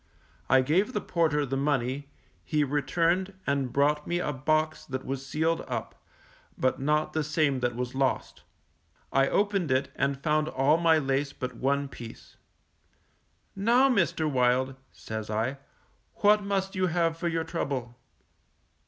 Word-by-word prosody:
I 130 0 +6
gave 180 - +1
the 210 - 0
porter 155 -6 +1
the 135 0 -3
money; 140 0 -1 0.3
he 150 -1 +1
returned, 170 +7 0
and 140 -3 0
brought 150 +2 +1
me 175 - 0
a 150 -4 -1
box 155 +3 0
that 130 -1 -5
was 135 0 -4
sealed 160 +4 0
up, 120 -4 -4 0.6
but 130 +1 +1
not 150 +3 +1
the 155 - 0
same 150 -3 +1
that 120 -1 -1
was 125 0 -3
lost. 130 - -1 0.7
I 135 0 +4
opened 200 -5 +1
it 130 +1 +1
and 140 0 0
found 155 0 +2
all 145 +2 +3
my 165 -1 +4
lace 140 -1 0
but 125 -1 -5
one 140 +3 0
piece. 120 -4 -11 1.2
Now, 240 +7 +4
Mr. 170 - +1
Wild, 130 -1 +2 0.2
says 110 -1 -6
I, 115 +6 -1 0.6
_what 210 0 +5
must 195 -1 -1
you 185 0 +1
have 165 -1 +1
for 170 +1 -3
your 165 -1 0
trouble? 135 -7 -3
145 Hz, 150 wpm, -28 LUFS, 130-165 Hz, 1.2 s, I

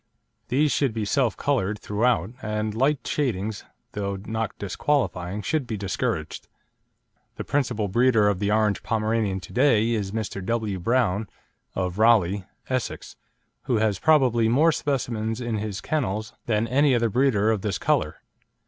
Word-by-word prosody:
These 145 +4 +2
should 135 -6 +1
be 110 -2 -1
self 125 0 +1
coloured 110 -8 0
throughout, 105 -3 0
and 105 0 -2
light 135 +5 +1
shadings, 110 -7 -2 0.3
though 100 -1 -3
not 110 0 -3
disqualifying, 100 -4 -1
should 155 -6 -1
be 110 - -3
discouraged. 100 -1 -3 0.9
The - - -5
principal 120 -7 0
breeder 115 +1 +3
of 100 -3 +1
the 100 0 0
orange 105 -2 +2
Pomeranian 110 -3 0
to - - -11
day 120 -4 +3
is 105 -4 -1
Mr. 105 -3 -4
W. 110 -2 -1
Brown, 105 -1 +1 0.5
of 90 +1 -2
Raleigh, 100 -4 +4 0.2
Essex, 130 -2 -3 0.5
who 125 - +1
has 105 -3 +1
probably 125 -7 +3
more 150 +8 +4
specimens 115 -7 -2
in 120 -3 -2
his 100 -3 -4
kennels 110 -7 -2
than 110 0 +1
any 135 +2 +3
other 115 -2 +1
breeder 110 -4 +3
of 110 -3 -1
this 100 -3 -1
colour. - - 0
110 Hz, 150 wpm, -25 LUFS, 105-125 Hz, 0.9 s, Raleigh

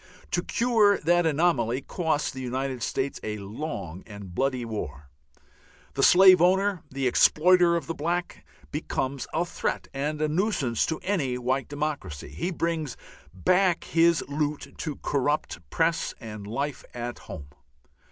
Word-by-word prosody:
To 175 - +1
cure 220 -2 +3
that 175 +1 +2
anomaly 140 -6 +1
cost 160 -3 -1
the 130 - -6
United 130 0 -3
States 135 +5 -2
a 105 0 -4
long 100 - -6
and 100 -4 -9
bloody 130 +1 0
war. 75 -10 -6 0.8
The - - -1
slave 185 -1 +8
owner, 190 0 +3
the 135 0 -3
exploiter 175 +6 +5
of 165 -4 -2
the 165 - -3
black, 170 +3 -3 0.3
becomes 140 -3 -3
a 170 +2 0
threat - - -3
and 145 +3 -2
a 155 - +1
nuisance 155 - 0
to 160 - -2
any 145 -11 0
white 130 +2 -1
democracy. 145 - -4
He 175 - -3
brings 165 -5 -2 0.3
back 180 - +2
his 170 0 +3
loot 145 -1 -3
to 150 -3 -3
corrupt 145 - 0
Press 165 0 0
and 105 -4 -8
life 140 +5 -3
at 120 0 -5
home. 70 -2 -9
145 Hz, 140 wpm, -26 LUFS, 125-170 Hz, 0.8 s, slave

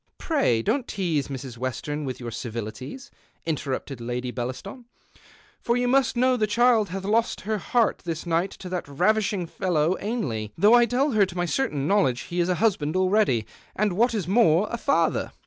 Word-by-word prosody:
" - - -48
Pray, 125 - +1
don't 270 - 0
tease 170 -9 -1
Miss 130 -3 -7
Western 145 +4 -3
with 130 -2 -5
your 120 -2 -5
ei\ilities,'* 115 - -6 0.3
interrupted 135 -4 -3
Lady 125 +1 -3
Bellaston, 130 - -6 0.4
" - - -27
for 235 +1 +1
you 245 0 +1
must 260 -1 +2
know 255 +1 +3
the 215 -3 +1
child 230 -1 +3
hath 190 +1 -5
lost 225 +4 0
her 215 +1 -2
heart 230 +4 +1
this 165 -2 -4
night 170 +3 +1
to 185 - -10
that 180 -1 -3
raxishing 200 +5 +1
fellow 170 -1 0
Ainlev, 125 - -3
though 205 +6 +5
I 240 -1 +6
tell 265 +5 +1
her 210 -4 +3
to 180 - -9
my 175 - +1
certain 155 - -1
knowledge 180 -11 +2
he 175 - -5
is 175 +1 +1
a 180 - +2
husljand 175 -8 0
already, 185 - +2 0.3
and, 210 -2 +1
what 230 +5 +2
is 195 -6 -2
more, 195 -2 +4
a 235 - -2
father. 280 +3 +1
185 Hz, 190 wpm, -25 LUFS, 140-225 Hz, 0.4 s, I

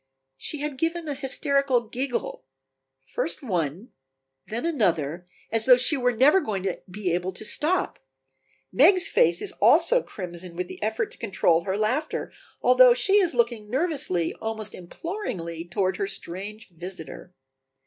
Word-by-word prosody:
She 285 - -5
had 295 -3 -4
given 330 +1 -1
a 295 - -2
hysterical 275 -1 +2
giggle, 245 - -4 0.6
first 285 - -3
one, 180 - -2 0.6
then 235 +7 -4
another, 175 - 0 0.2
as 225 +1 +1
though 250 -1 +8
she 255 +5 +4
were 250 -2 +1
never 275 +10 +4
going 200 - -3
to 190 -2 -3
be 180 -2 -2
able 180 +2 -1
to 215 - -7
stop. 330 +11 0 0.7
Meg's 345 - +5
face 170 +2 +2
is - - -1
also - - +5
crimson 180 - -7
with 180 +1 -3
the - - -10
effort 220 +1 -1
to - - -13
control 185 -6 +1
her 190 0 -1
laughter, 255 +9 -1 0.3
although 250 0 +7
she 390 +10 +3
is 365 -9 +2
looking 235 -3 0
nervously, 265 - 0
almost 220 -1 -4
imploringly, 175 - -6
toward 185 +2 -1
her 400 - -1
strange 205 - -6
visitor. 175 0 -9
225 Hz, 150 wpm, -25 LUFS, 180-280 Hz, 0.7 s, though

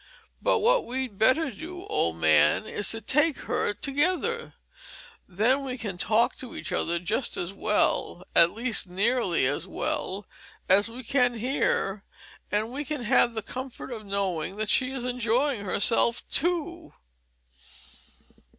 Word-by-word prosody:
But - - +2
what - - +3
we'd 255 -5 -4
better 270 +6 +3
do, 355 - -9
old 85 - 0
man, 80 -2 +4
is 205 - -1
to 225 - -1
take 300 +3 +2
her - - 0
together 360 - -1 0.7
then 230 +9 +2
we 260 -1 -4
can 200 -7 -5
talk 220 +4 +2
to 255 - -8
each 165 +5 -6
other 170 -1 0
just 180 +9 -2
as 175 +2 -4
well, 205 -3 0
at 170 - +7
least 230 -1 -2
nearly 195 - +1
as 145 +6 -1
well, 190 +1 -3 0.4
as 205 +4 +4
we 245 +3 -9
can 245 0 +2
here, 215 -5 0 0.5
and 215 +3 -1
we 285 +3 -4
can 295 -3 -4
have 240 0 +3
the 220 - -3
comfort 255 +2 -7
of 225 -3 -6
knowing 195 -3 -2
that 215 +1 -2
she 255 - +2
is 260 -2 -4
enjoying 250 +1 0
herself 230 +4 +2
too. 345 -1 -1
235 Hz, 145 wpm, -26 LUFS, 200-270 Hz, 0.7 s, at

